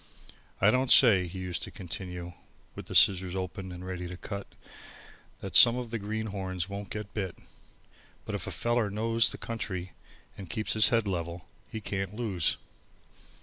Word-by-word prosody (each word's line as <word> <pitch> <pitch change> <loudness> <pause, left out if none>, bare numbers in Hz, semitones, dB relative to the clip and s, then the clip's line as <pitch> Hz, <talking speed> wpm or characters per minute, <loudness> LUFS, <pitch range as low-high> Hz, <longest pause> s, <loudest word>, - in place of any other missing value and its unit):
I 105 +3 +5
don't 130 +1 +1
say," 100 -8 +7
he 85 - -8
used 90 -2 -3
to - - -5
continue, 90 -1 -6 0.4
with - - -9
the - - -5
scissors 95 -1 +5
open 95 0 -4
and 90 +1 -8
ready 90 -1 -5
to 90 0 -7
cut, 100 +1 -6 0.9
"that - - -6
some 120 - +9
of 120 -2 -5
the 115 - -2
greenhorns 100 -4 -3
won't 100 0 -6
get 105 -2 -6
bit. 95 -5 -3 0.9
But - - -5
if - - -4
a - - -3
feller 120 -2 +1
knows 115 +2 +2
the - - -7
country 100 -6 -5 0.4
and 95 -4 -9
keeps 110 +4 -1
his 110 -1 +6
head 115 -3 +2
level, 85 -2 -3 0.2
he 110 -1 -6
can't 95 0 -3
lose." 100 -8 +1
100 Hz, 170 wpm, -29 LUFS, 90-110 Hz, 0.9 s, some